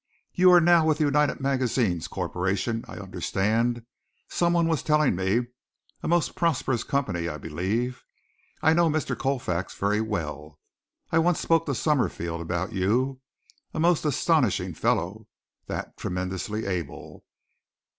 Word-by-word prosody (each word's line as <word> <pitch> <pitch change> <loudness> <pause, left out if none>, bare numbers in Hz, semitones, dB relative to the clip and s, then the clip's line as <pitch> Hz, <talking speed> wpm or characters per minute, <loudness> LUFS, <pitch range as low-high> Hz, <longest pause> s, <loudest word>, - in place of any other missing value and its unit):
You 185 0 +6
are 175 - +8
now 170 -1 +5
with 155 -1 +3
the 155 - +1
United 150 0 +2
Magazines 125 -10 0
Corporation, 100 +5 -2
I - - -9
understand 105 +5 -1 0.4
someone 170 -1 +2
was 160 -2 +1
telling 150 - +2
me 95 +6 +1 0.6
a - - -4
most 175 -1 +2
prosperous 135 -8 0
company, 90 -12 -1
I 75 - -5
believe. 100 - -2 0.6
I 160 - +5
know 170 0 +4
Mr. 155 0 -1
Colfax 115 -10 -2
very 105 +2 +1
well. 75 -8 -4 0.5
I 165 - +4
once 175 +1 +2
spoke 165 -1 +2
to 140 - 0
Summerfield 85 - 0
about 90 +5 -3
you. 125 +8 0 0.5
A - - -2
most 170 0 +3
astonishing 150 -3 +1
fellow, - - -1 0.4
that, - - -5
tremendously 95 +4 -3
able. 90 -6 -5
120 Hz, 135 wpm, -26 LUFS, 95-150 Hz, 0.6 s, are